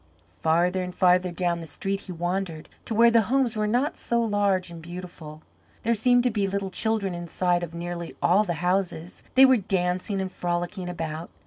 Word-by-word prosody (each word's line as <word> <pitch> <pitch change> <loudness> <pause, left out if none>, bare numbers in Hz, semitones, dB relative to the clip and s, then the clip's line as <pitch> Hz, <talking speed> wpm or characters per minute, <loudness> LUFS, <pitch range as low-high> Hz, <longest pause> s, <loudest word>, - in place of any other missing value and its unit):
Farther 175 +3 +2
and 180 0 -5
farther 180 0 +4
down 175 0 -1
the 165 - -8
street 195 +4 -3
he 190 - -10
wandered, 175 -1 -3 0.2
to 225 - -3
where 235 +1 +6
the 230 -1 +5
homes 260 -3 +2
were 215 0 0
not 245 +7 +1
so 235 - -1
large 205 -5 +1
and 165 -1 -9
beautiful. 170 -3 -9 0.4
There 235 - +2
seemed 245 +2 +3
to 250 - +2
be 205 -2 0
little 195 0 -3
children 215 -2 0
inside 175 +1 0
of 170 -1 -6
nearly 170 0 -5
all 190 +5 +4
the 175 -5 -2
houses. 180 -2 -1
They 265 +1 +9
were 260 -1 +5
dancing 185 0 -1
and 190 -1 -3
frolicking 175 +1 -3
about. 165 -1 -5
185 Hz, 190 wpm, -25 LUFS, 175-210 Hz, 0.4 s, They